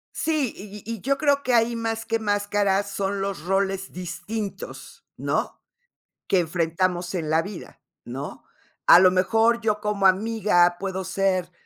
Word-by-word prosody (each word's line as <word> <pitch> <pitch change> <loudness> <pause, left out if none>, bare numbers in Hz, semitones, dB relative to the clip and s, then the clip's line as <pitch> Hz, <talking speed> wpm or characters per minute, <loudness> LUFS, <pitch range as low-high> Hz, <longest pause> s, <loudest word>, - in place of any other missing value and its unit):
Sí, 305 -7 0
y 205 0 -10
y 230 -2 -5
yo 275 +1 +1
creo 285 -1 +2
que 250 -3 +1
ahí, 235 +1 +3
más 225 -1 -3
que 225 0 0
máscaras, 205 -1 +1
son 200 0 -2
los 195 -4 -3
roles 195 0 -1
distintos, 185 +3 -6
¿no?, - - -2 0.7
que 190 - +3
enfrentamos 175 +1 -1
en 165 -4 -3
la 160 +1 +3
vida, 195 +1 -9 0.2
¿no?, 135 +4 -7 0.4
a 175 - +10
lo 185 -1 +6
mejor, 225 +5 +2
yo 210 -1 0
como 210 -2 +2
amiga 190 -3 +3
puedo 190 -1 -3
ser 185 -1 0
195 Hz, 150 wpm, -24 LUFS, 185-225 Hz, 0.7 s, a